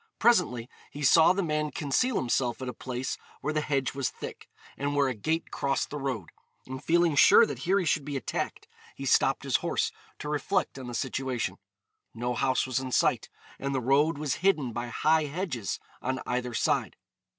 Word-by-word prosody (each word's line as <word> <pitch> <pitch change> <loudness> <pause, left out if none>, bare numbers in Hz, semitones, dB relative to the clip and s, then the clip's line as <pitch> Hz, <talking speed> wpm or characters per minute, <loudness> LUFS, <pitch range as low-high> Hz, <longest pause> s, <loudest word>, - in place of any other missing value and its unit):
Presently 180 - +3 0.2
he 145 - -7
saw 160 +5 +7
the 195 +1 0
man 150 -2 0
conceal 165 - 0
himself 120 -3 0
at 130 - -5
a 125 - -3
place 130 +2 -4 0.2
where 155 - -1
the 155 - +1
hedge 135 -3 -1
was 135 -3 -1
thick, - - -9 0.3
and 145 +1 -2
where 140 -1 +3
a 130 - 0
gate 160 +10 -2
crossed 140 0 -1
the 150 - -4
road; 130 -9 -3 0.4
and 130 +2 -7
feeling 170 -2 +3
sure 460 - +8
that - - -5
here 190 +3 +2
he 190 - +1
should 155 -2 +1
be 145 0 -3
attacked, 130 - -4 0.3
he - - -6
stopped - - +3
his - - +2
horse - - -1 0.3
to - - -7
reflect 150 +1 -1
on 130 - -7
the 120 - -5
situation. 125 -6 -2 0.6
No 120 +2 -2
house 130 +1 +1
was 130 -1 -1
in 130 -1 -5
sight, - - +2 0.3
and 140 0 -2
the - - +2
road 140 +5 +3
was 150 -2 -1
hidden 155 -11 +2
by 120 +1 -3
high 155 +5 +2
hedges 145 - -3 0.2
on 130 +1 -2
either 125 -1 -2
side. - - 0
140 Hz, 195 wpm, -28 LUFS, 125-155 Hz, 0.6 s, sure